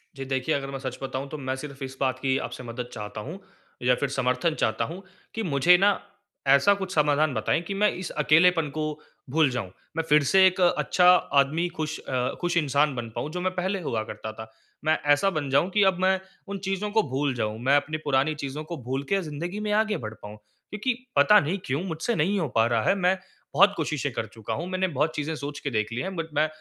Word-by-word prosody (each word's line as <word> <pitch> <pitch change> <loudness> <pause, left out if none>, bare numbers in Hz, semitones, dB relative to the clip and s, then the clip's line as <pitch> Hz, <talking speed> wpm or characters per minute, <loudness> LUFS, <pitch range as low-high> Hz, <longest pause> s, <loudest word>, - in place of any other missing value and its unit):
जी, 135 0 -6
देखिए, 135 +3 0
अगर 135 -1 -3
मैं 135 - -5
सच 130 -1 -5
बताऊँ, 135 0 -4
तो 155 - -6
मैं 130 -2 -3
सिर्फ़ 140 0 -8
इस 130 0 -7
बात 130 -2 0
की 130 0 +1
आपसे 125 +1 -9
मदद 120 +1 -6
चाहता 105 -1 -6
हूँ 160 - -7 0.4
या 125 0 +4
फिर 140 +2 -2
समर्थन 130 +4 0
चाहता - - +1
हूँ 175 +4 -7 0.3
कि 225 - -2
मुझे 170 +1 +5
ना, 200 +1 +3 0.5
ऐसा 140 +9 +6
कुछ 190 -2 -4
समाधान 150 -1 +3
बताएँ 160 - 0
कि 195 - -5
मैं 210 +2 +3
इस 180 -2 -5
अकेलापन 165 +1 +4
को 155 - 0 0.5
भूल 155 +1 +3
जाऊँ। 120 -8 -4 0.3
मैं 165 - +1
फिर 150 0 +5
से 190 +7 +5
एक 185 0 -1
अच्छा 180 0 +3 0.3
आदमी, 155 +5 +2
खुश 155 -3 -4
अ, 125 -1 -2
खुश 175 0 0
इंसान 145 -2 +2
बन 120 -2 -4
पाऊँ, - - -3
जो 180 +2 -4
मैं 185 +1 0
पहले 190 +2 -1
हुआ 115 -9 -2
करता 110 0 -7
था। 110 0 -10 0.3
मैं 155 - +3 0.2
ऐसा 145 +7 +2
बन 155 -7 -3
जाऊँ 140 +7 +3
कि 205 +1 +3
अब 190 -2 +3
मैं 190 0 +3 0.3
उन 200 - -3
चीज़ों 195 +2 -1
को 220 +1 +3
भूल 135 +1 0
जाऊँ। 110 -2 -2
मैं 135 +2 +4
अपनी 150 +2 0
पुरानी 140 +2 +2
चीज़ों 145 +1 -5
को 165 +2 -6
भूल 130 +3 -2
के 195 -1 +2
ज़िंदगी 170 +5 -5
में 210 0 -2
आगे 215 0 +2
बढ़ 110 -2 -6
पाऊँ। 105 +1 -9
क्योंकि 210 - -5 0.2
पता 210 0 +7
नहीं 175 +3 -1
क्यों, 140 +6 -1
मुझसे 185 +6 -2
नहीं 190 +6 +1
हो 160 - 0
पा 115 0 +5
रहा 115 -2 +1
है। 195 - +3
मैं 185 0 +2 0.4
बहुत 200 +7 +6
कोशिशें 150 -3 -2
कर 115 - -2
चुका 110 0 -5
हूँ, 170 +10 -4
मैंने 185 0 0
बहुत 155 -1 -1
चीज़ें 150 +2 -2
सोच 145 -1 -6
के 140 - -3
देख 110 -1 -1
ली 120 - -2
हैं, 190 0 -4
बट 165 -2 -3
मैं 155 +1 +2
150 Hz, 230 wpm, -26 LUFS, 130-180 Hz, 0.5 s, पता